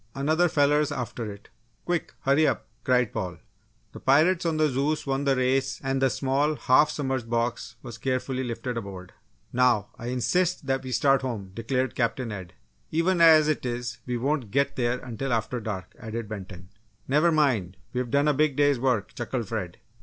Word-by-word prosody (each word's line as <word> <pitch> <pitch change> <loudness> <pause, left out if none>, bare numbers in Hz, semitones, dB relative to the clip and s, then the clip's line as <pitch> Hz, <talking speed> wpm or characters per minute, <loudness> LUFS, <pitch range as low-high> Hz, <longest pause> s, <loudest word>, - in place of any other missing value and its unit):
"Another 155 +6 +2
feller's 145 0 +3
after 120 -5 -4
it 100 0 -13 0.4
quick 175 -2 -2
hurry 140 +3 +3
up!" - - -1 0.2
cried 125 -3 +2
Paul. 90 -2 -3 0.5
The - - -10
pirates 165 +6 +3
on 160 -1 0
the 155 0 +4
Zeus 145 +3 -1
won 135 0 -1
the 135 -1 +3
race 130 +1 +1
and 135 0 -1
the 135 - +4
small 135 +5 0
half 145 +2 +4
submerged 130 -6 -2
box 120 0 -1
was 120 -3 -8
carefully 130 +1 -1
lifted 120 0 -4
aboard. 95 -4 -7 0.4
"Now, 120 -5 +3
I 120 - -6
insist 155 +8 0
that 135 0 0
we 130 - -7
start 135 +1 +3
home!" 110 -8 -4
declared 125 +2 -1
Captain 120 0 -1
Ed. 95 -4 -7 0.4
"Even 170 +2 +1
as 160 -2 +7
it 155 - 0
is 120 -2 -4
we 125 -1 -1
won't 135 -2 -1
get 140 +4 +1
there 120 0 0
until 125 +2 -4
after 115 +2 -1
dark!" 105 -4 -5
added 115 0 -5
Benton. 95 -4 -8 0.4
"Never 150 +5 +3
mind, 120 - +1 0.2
we've 125 -1 -2
done 140 +4 +2
a 150 - +4
big 150 0 +2
day's 145 -2 +3
work!" 120 -6 0
chuckled 120 -2 -4
Fred. 95 -6 -4
130 Hz, 180 wpm, -26 LUFS, 115-145 Hz, 0.5 s, as